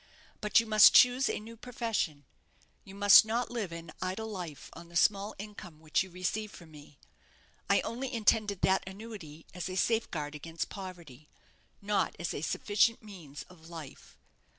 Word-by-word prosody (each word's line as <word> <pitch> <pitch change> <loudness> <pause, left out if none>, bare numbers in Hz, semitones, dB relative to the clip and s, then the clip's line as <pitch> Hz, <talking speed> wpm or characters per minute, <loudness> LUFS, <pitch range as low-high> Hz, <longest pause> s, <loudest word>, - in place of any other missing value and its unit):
But 210 +1 +4
you 230 - -1
must 215 -1 +7
choose 250 +2 +6
a - - -2
new 225 +2 -11
profession. 225 - -3 0.6
You 195 - -12
must 205 0 +8
not 230 +3 -2
live 220 -7 -3
an 165 -1 -8
idle 190 +4 -3
life 175 -8 -7
on 170 - -12
the 170 - -15
small 200 +4 +2
income 195 -6 -10
which 155 -1 0
you 190 - -5
receive 185 +4 -3
from 170 -5 -14
me. 145 -1 -15 0.7
I - - +4
only 255 +3 -4
intended 215 -4 +1
that 190 0 +3
annuity 190 -7 -10
as 180 +1 -5
a 185 - -5
safeguard 175 -9 -1
against 165 +2 -5
poverty, 170 -8 -10 0.5
not 205 0 0
as 175 - -3
a - - -5
sufficient 210 +7 +1
means 170 -9 -10
of 165 -2 -17
life. 160 -5 -11
190 Hz, 165 wpm, -31 LUFS, 165-215 Hz, 0.7 s, must